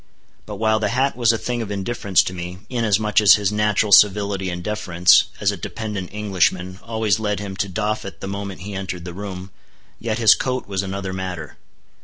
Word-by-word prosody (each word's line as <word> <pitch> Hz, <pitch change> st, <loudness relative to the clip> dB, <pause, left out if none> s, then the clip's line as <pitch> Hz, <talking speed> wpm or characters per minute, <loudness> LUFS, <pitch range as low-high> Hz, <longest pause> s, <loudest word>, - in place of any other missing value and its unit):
But 105 Hz, -, -6 dB
while 110 Hz, +1 st, +1 dB
the 105 Hz, -1 st, 0 dB
hat 130 Hz, +3 st, +1 dB
was 120 Hz, -2 st, +3 dB
a 115 Hz, -, -1 dB
thing 120 Hz, +1 st, -3 dB
of 110 Hz, -, -5 dB
indifference 100 Hz, -1 st, +1 dB
to 90 Hz, -, -5 dB
me, 90 Hz, 0 st, -6 dB
inasmuch 110 Hz, -3 st, +2 dB
as 100 Hz, -5 st, +8 dB
his 100 Hz, -1 st, 0 dB
natural 105 Hz, 0 st, +1 dB
civility 100 Hz, 0 st, +4 dB
and 90 Hz, 0 st, -5 dB
deference, 90 Hz, -4 st, +3 dB
as -, -, +2 dB
a -, -, -6 dB
dependent 105 Hz, -5 st, -5 dB
Englishman, 95 Hz, -3 st, -1 dB
always 110 Hz, -3 st, 0 dB
led 105 Hz, -2 st, -1 dB
him 100 Hz, -1 st, -6 dB
to 100 Hz, -, -1 dB
doff 105 Hz, +2 st, -2 dB
it 100 Hz, -, -9 dB
the -, -, -6 dB
moment 100 Hz, -1 st, -6 dB
he 100 Hz, +2 st, -7 dB
entered 95 Hz, -2 st, -5 dB
the 90 Hz, -, -6 dB
room, 95 Hz, -1 st, -7 dB, 0.5 s
yet 110 Hz, -1 st, -2 dB
his 115 Hz, -2 st, +7 dB
coat 130 Hz, -1 st, -3 dB
was 95 Hz, -2 st, -2 dB
another 95 Hz, -1 st, -4 dB
matter. 90 Hz, -5 st, -6 dB
100 Hz, 200 wpm, -21 LUFS, 95-110 Hz, 0.5 s, as